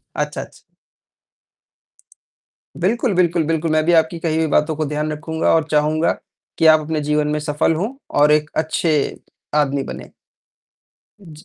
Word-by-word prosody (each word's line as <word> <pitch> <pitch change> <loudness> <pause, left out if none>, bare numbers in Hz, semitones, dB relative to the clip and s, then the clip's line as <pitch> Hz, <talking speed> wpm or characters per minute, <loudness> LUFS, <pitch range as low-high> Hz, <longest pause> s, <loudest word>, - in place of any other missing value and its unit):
अच्छा, - - -3
अच्छा। - - -14 2.2
बिल्कुल, 225 +5 +1
बिल्कुल, 175 -2 +2
बिल्कुल। 165 0 -1
मैं 155 0 +2
भी 175 - +2
आपकी 165 +1 +2
कही 160 -1 -1
हुई 160 0 +1
बातों 150 +1 +2
को 155 - -1
ध्यान 150 +1 -2
रखूँगा 160 +1 -1
और 160 -2 +2
चाहूँगा 155 +2 +2 0.5
कि 165 - +4
आप 155 0 +7
अपने 155 0 -3
जीवन 150 0 0
में 150 - -1
सफल 150 +2 0
हों 205 +11 -3 0.3
और 150 +1 +6
एक 150 0 +1
अच्छे 160 +1 0 0.6
आदमी 140 -2 +1
बने। - - -10 1.1
जी। 160 -4 -14
155 Hz, 150 wpm, -19 LUFS, 150-165 Hz, 2.2 s, आप